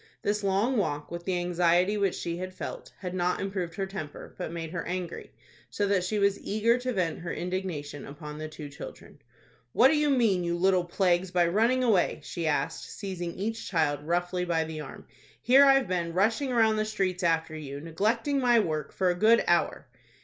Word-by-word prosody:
This 210 Hz, 0 st, 0 dB
long 200 Hz, +6 st, +1 dB
walk, 150 Hz, -7 st, -2 dB
with 170 Hz, 0 st, -6 dB
the 185 Hz, -2 st, 0 dB
anxiety 175 Hz, +2 st, +2 dB
which 200 Hz, -3 st, +1 dB
she 170 Hz, 0 st, -4 dB
had 185 Hz, +1 st, -6 dB
felt, -, -, -7 dB
had 180 Hz, -2 st, -6 dB
not 180 Hz, 0 st, 0 dB
improved 190 Hz, -4 st, -3 dB
her 195 Hz, -, -2 dB
temper, 190 Hz, -7 st, -8 dB
but -, -, -5 dB
made 165 Hz, -1 st, -5 dB
her 170 Hz, -1 st, -3 dB
angry, 180 Hz, -1 st, -4 dB, 0.4 s
so 205 Hz, -, -1 dB
that 200 Hz, -2 st, +2 dB
she 210 Hz, +4 st, -1 dB
was 200 Hz, -1 st, +2 dB
eager 230 Hz, +4 st, +1 dB
to 255 Hz, +1 st, -2 dB
vent 180 Hz, -7 st, -1 dB
her 170 Hz, -, -5 dB
indignation 175 Hz, -6 st, -4 dB
upon 150 Hz, +1 st, -8 dB
the 155 Hz, -, -4 dB
two 155 Hz, -1 st, -8 dB
children. 140 Hz, -1 st, -11 dB, 0.5 s
"What 255 Hz, -, +6 dB
do 315 Hz, -, +3 dB
you 300 Hz, 0 st, +2 dB
mean, 225 Hz, -9 st, +3 dB
you 170 Hz, 0 st, -1 dB
little 185 Hz, 0 st, +3 dB
plagues, 180 Hz, 0 st, +1 dB
by 175 Hz, -1 st, +3 dB
running 230 Hz, +9 st, +2 dB
away?" 210 Hz, -7 st, +2 dB
she 170 Hz, -2 st, -4 dB
asked, 150 Hz, -, -1 dB
seizing 180 Hz, -4 st, -5 dB
each 225 Hz, +4 st, -4 dB
child 150 Hz, -5 st, +1 dB
roughly 175 Hz, +3 st, -1 dB
by 170 Hz, -2 st, +1 dB
the 160 Hz, -1 st, -6 dB
arm. -, -, -10 dB, 0.3 s
"Here 270 Hz, +3 st, +6 dB
I've 270 Hz, -4 st, +5 dB
been 170 Hz, -2 st, -2 dB
rushing 220 Hz, +9 st, +1 dB
round 220 Hz, -3 st, +3 dB
the 215 Hz, -, +1 dB
streets 195 Hz, -4 st, -1 dB
after 165 Hz, -2 st, +1 dB
you, 140 Hz, -2 st, -6 dB
neglecting 220 Hz, -, 0 dB
my 240 Hz, -2 st, +4 dB
work, 155 Hz, -8 st, -2 dB
for 185 Hz, -1 st, +1 dB
a -, -, +1 dB
good 220 Hz, +6 st, +4 dB
hour." -, -, +1 dB
185 Hz, 200 wpm, -28 LUFS, 170-210 Hz, 0.5 s, What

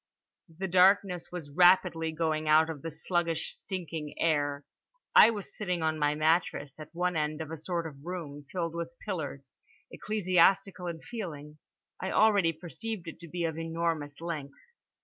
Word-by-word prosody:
The 175 Hz, +4 st, -5 dB
darkness 185 Hz, 0 st, +4 dB
was 165 Hz, -5 st, -7 dB
rapidly 175 Hz, -1 st, +4 dB
going 155 Hz, -1 st, -1 dB
out 160 Hz, +1 st, +5 dB
of 150 Hz, -4 st, -8 dB
the 165 Hz, -, -4 dB
sluggish 165 Hz, +1 st, -1 dB
stinking 165 Hz, -5 st, -6 dB
air. 145 Hz, -3 st, 0 dB, 0.5 s
I 220 Hz, -, +10 dB
was 205 Hz, -4 st, -5 dB
sitting 180 Hz, -5 st, -2 dB
on 155 Hz, 0 st, 0 dB
my 150 Hz, 0 st, +2 dB
mattress 155 Hz, -2 st, +1 dB
at 155 Hz, 0 st, -9 dB
one 180 Hz, +1 st, -1 dB
end 150 Hz, -1 st, -1 dB
of 160 Hz, -1 st, -6 dB
a -, -, -3 dB
sort 170 Hz, +2 st, -3 dB
of 140 Hz, -3 st, -9 dB
room, 150 Hz, -5 st, -6 dB
filled 170 Hz, -2 st, -2 dB
with 170 Hz, 0 st, -5 dB
pillars; 145 Hz, -9 st, -5 dB, 0.4 s
ecclesiastical 190 Hz, -2 st, +2 dB
in 165 Hz, -2 st, -5 dB
feeling. 155 Hz, -10 st, -7 dB, 0.4 s
I 190 Hz, -, -2 dB
already 205 Hz, -6 st, +4 dB
perceived 180 Hz, +4 st, -6 dB
it 165 Hz, -, -8 dB
to 170 Hz, -, -10 dB
be 175 Hz, +2 st, -3 dB
of 160 Hz, -1 st, -2 dB
enormous 165 Hz, -3 st, -2 dB
length. 155 Hz, -5 st, -5 dB
165 Hz, 160 wpm, -30 LUFS, 155-180 Hz, 0.5 s, I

